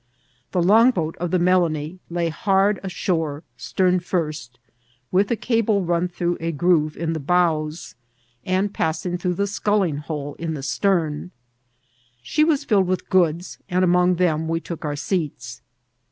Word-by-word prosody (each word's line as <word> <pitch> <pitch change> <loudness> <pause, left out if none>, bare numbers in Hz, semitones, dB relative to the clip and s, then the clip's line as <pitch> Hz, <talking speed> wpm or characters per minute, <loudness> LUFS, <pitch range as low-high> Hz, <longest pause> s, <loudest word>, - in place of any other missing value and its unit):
The 180 -2 +1
longboat 200 -4 +4
oi 175 - 0
the 185 +2 +1
Melanie 175 -2 +1
lay 170 -1 -1
hard 195 +3 +2
ashore, 165 -5 -2
stem 185 -1 +1
first, 155 -8 -3 0.5
with 195 +2 +2
a 235 - +2
cable 220 -3 +1
run 175 0 +1
through 175 0 -2
a 165 +1 -2
groove 155 -1 +1
in 165 0 -2
the 160 - -3
bows, 160 0 0 0.5
and 190 +2 0
passing 160 +3 -1
through 180 0 -1
the 200 - 0
sculling 200 -5 0
hole 145 -1 -5
in 165 -1 -3
die 140 - -5
stem. 160 +1 0 0.9
She 220 - +2
was 305 -3 +2
filled 205 -8 +2
with 185 0 -2
goods, 175 -1 +1
and 185 +1 +2
amcmg 180 0 +3
them 160 -3 +1
we 165 0 0
took 170 -1 -7
our 145 -1 -2
seats. 145 -7 -3
175 Hz, 155 wpm, -22 LUFS, 155-185 Hz, 0.9 s, longboat